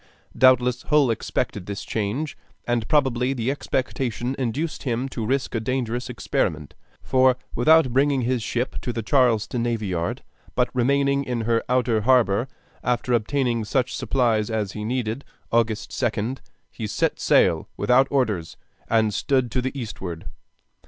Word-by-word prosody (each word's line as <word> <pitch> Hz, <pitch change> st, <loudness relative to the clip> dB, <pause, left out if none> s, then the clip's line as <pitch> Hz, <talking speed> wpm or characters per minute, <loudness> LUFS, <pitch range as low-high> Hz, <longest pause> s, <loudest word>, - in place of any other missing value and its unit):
Doubtless 125 Hz, -1 st, +4 dB
Hull 150 Hz, -5 st, +3 dB
expected 100 Hz, -4 st, -3 dB
this 100 Hz, 0 st, -5 dB
change, 115 Hz, +8 st, -2 dB, 0.3 s
and 120 Hz, -2 st, -1 dB
probably 130 Hz, -3 st, +2 dB
the 125 Hz, 0 st, -1 dB
expectation 130 Hz, -2 st, -2 dB
induced 135 Hz, +6 st, -2 dB
him 125 Hz, 0 st, -1 dB
to 115 Hz, -, -4 dB
risk 135 Hz, +2 st, -1 dB
a 115 Hz, -, 0 dB
dangerous 125 Hz, +1 st, -2 dB
experiment; 80 Hz, -10 st, -2 dB, 0.3 s
for 130 Hz, -1 st, +3 dB, 0.2 s
without 150 Hz, 0 st, +4 dB
bringing 135 Hz, 0 st, +3 dB
his 125 Hz, 0 st, 0 dB
ship 120 Hz, +3 st, -2 dB
to 125 Hz, -, -3 dB
the 115 Hz, -1 st, -4 dB
Charlestown 120 Hz, -1 st, +2 dB
Navy 115 Hz, -2 st, -1 dB
Yard, 85 Hz, -3 st, -2 dB, 0.3 s
but 125 Hz, 0 st, +1 dB
remaining 140 Hz, +2 st, +2 dB
in 125 Hz, -2 st, -3 dB
the 115 Hz, 0 st, +1 dB
outer 120 Hz, -3 st, +2 dB
harbor, 120 Hz, -1 st, +3 dB, 0.4 s
after 125 Hz, 0 st, 0 dB
obtaining 120 Hz, +1 st, +1 dB
such 125 Hz, +4 st, 0 dB
supplies 115 Hz, -5 st, +1 dB
as 110 Hz, -3 st, -1 dB
he 105 Hz, -, -6 dB
needed, 120 Hz, +2 st, -2 dB, 0.3 s
August 115 Hz, -2 st, 0 dB
2d, 120 Hz, +3 st, -1 dB, 0.3 s
he 110 Hz, -, -5 dB
set -, -, -1 dB
sail -, -, +3 dB
without 130 Hz, +2 st, +4 dB
orders, 105 Hz, -12 st, -1 dB, 0.3 s
and 110 Hz, -2 st, +2 dB
stood 130 Hz, -2 st, +1 dB
to 125 Hz, -, 0 dB
the 130 Hz, +2 st, -4 dB
eastward. 95 Hz, -8 st, -6 dB
120 Hz, 145 wpm, -24 LUFS, 110-130 Hz, 0.4 s, Doubtless